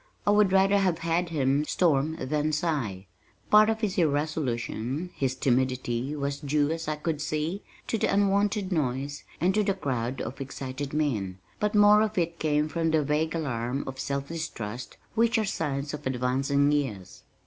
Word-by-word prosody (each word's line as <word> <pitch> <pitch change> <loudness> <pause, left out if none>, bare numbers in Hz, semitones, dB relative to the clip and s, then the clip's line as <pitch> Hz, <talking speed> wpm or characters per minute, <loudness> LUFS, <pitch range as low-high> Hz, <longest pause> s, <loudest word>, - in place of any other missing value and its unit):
I 205 - +4
would 205 -2 +4
rather 195 +1 +4
have 185 -4 +2
had 170 +1 0
him 140 -2 +1
storm 155 -2 +2
than 150 +3 0
sigh. 140 - -1 0.5
Part 215 +1 +7
of 220 0 -1
his 200 -4 0
irresolution, 145 -1 -1
his 130 -1 -1
timidity, 130 +1 0
was 140 -1 -2
due, 145 0 +1
as 165 -1 -3
I 155 - 0
could 155 0 -3
see, 155 +5 -2 0.2
to 225 - -1
the - - +1
unwonted 200 0 +2
noise, 140 -2 -1 0.2
and 180 +3 +2
to 215 - +3
the 195 -1 +1
crowds 130 -6 -2
of 130 +5 -6
excited 135 +1 -5
men, 110 -12 -1 0.2
but 210 0 0
more 210 0 +7
of 215 -1 -1
it 170 -1 0
came 150 -1 +1
from 165 +2 0
the 155 -1 +2
vague 150 +3 0
alarm 130 -4 -2
of 130 0 -7
self 140 0 -3
distrust 125 -8 -5 0.2
which 230 +1 +3
are 220 - +1
signs 145 -6 -2
of 150 - -4
advancing 135 +3 +1
years. 130 -11 -2
150 Hz, 170 wpm, -27 LUFS, 135-175 Hz, 0.5 s, Part